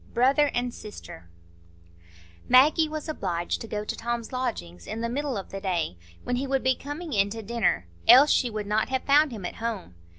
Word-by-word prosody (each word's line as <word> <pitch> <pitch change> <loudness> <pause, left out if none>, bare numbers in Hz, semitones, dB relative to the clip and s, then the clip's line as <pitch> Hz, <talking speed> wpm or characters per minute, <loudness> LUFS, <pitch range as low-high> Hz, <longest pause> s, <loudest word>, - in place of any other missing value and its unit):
Brother 275 +5 +4
and 245 0 -1
Sister 85 - -11 1.2
Maggie 300 +5 +5
was 310 0 -5
obliged 175 - -2
to 225 - -6
go 210 -1 -4
to - - -3
Tom's 235 +1 -4
lodgings 150 - -4
in 225 - -4
the 235 - -1
middle 275 -1 -2
of 195 - -6
the 195 - -6
day, 175 - -1 0.3
when 245 - -1
he 270 +2 -2
would 270 0 0
be 260 0 +3
coming 290 +4 -7
in 200 -1 +2
to 225 +2 -6
dinner, 220 - 0 0.2
else 275 +4 +8
she 250 - +2
would 215 -2 -4
not 210 +1 0
have 260 -1 -1
found 290 +1 +4
him 210 -6 -7
at - - -6
home. 225 - -4
235 Hz, 200 wpm, -26 LUFS, 205-270 Hz, 1.2 s, else